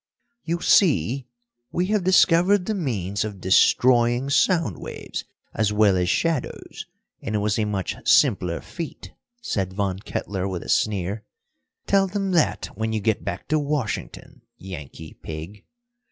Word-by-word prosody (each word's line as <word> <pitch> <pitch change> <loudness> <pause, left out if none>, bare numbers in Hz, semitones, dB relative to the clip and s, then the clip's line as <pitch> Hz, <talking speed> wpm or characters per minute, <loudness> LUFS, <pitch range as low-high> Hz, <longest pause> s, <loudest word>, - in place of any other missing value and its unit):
"You 170 +1 -2
see, 130 - +3 0.4
we 180 - 0
have 210 -3 +1
discovered 180 +1 +4
the 220 - -1
means 105 - -2
of 105 -3 -6
destroying 120 +7 +3
sound 165 - +2
waves - - -6 0.3
as 110 -2 +1
well 105 -2 +4
as 90 -1 +1
shadows, 165 - -2 0.3
and 110 - -3
it - - +2
was 105 +1 0
a 110 - +1
much 100 -3 -2
simpler 85 -2 +3
feat," 165 -3 -8 0.3
said 95 - -2
Von 95 -1 -2
Kettler 100 -1 -4
with 90 -3 -4
a - - -10
sneer. 100 0 0 0.6
"Tell 195 -1 +3
them 195 0 -2
that 170 -4 +1
when 110 +2 -2
you 110 - 0
get 110 0 0
back - - -5
to 155 - +2
Washington, 145 -5 -4 0.2
Yankee 80 -4 -9
pig. 80 +7 -8
110 Hz, 145 wpm, -23 LUFS, -, 0.6 s, discovered